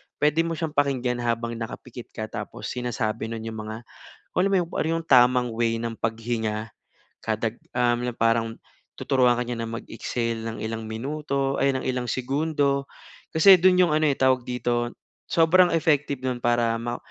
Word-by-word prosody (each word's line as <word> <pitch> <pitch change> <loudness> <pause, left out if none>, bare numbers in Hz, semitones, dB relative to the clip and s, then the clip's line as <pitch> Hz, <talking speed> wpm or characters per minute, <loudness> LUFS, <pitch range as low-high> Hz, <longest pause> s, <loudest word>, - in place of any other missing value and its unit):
puwede 150 +2 +2
mo 165 - -2
siyang 160 -1 -3
pakinggan 130 -4 0
habang 115 -1 -2
nakapikit 120 +1 -7
ka 110 - -3
tapos - - -6
sinasabi 120 -3 -2
nun 115 0 -5
yung 110 -1 -6
mga, 110 +2 -7 0.5
alam 190 +2 +3
mo 195 - +4
yun, 175 - -2
ano - - 0
yung 165 - -12
tamang 125 -1 +5
way 115 -1 +1
ng 115 -1 -4
paghinga, 110 -1 -2 0.5
kadag 110 +1 -2 0.2
um, 120 0 +2
parang 115 0 +1 0.4
tuturuan 125 -3 +3
ka 125 - -1
niya 120 - -3
na 115 - -4
mag-exhale 115 0 -3
ng 115 0 -5
ilang 110 0 -5
minuto, 140 +3 -2
ay 140 - +4
ng 130 - -5
ilang 125 -1 -2
segundo, 140 +1 0 0.4
kasi 180 +3 +7
do'n 180 0 +6
'yong 160 - 0
ano, 155 0 +2
eh, 140 - 0
tawag 130 -1 +3
dito, 120 -1 -1 0.4
sobrang 175 +2 +5
effective 145 -4 0
no'n 125 -1 -2
para 120 -1 +2
ma 120 0 -3
125 Hz, 170 wpm, -25 LUFS, 115-140 Hz, 0.5 s, kasi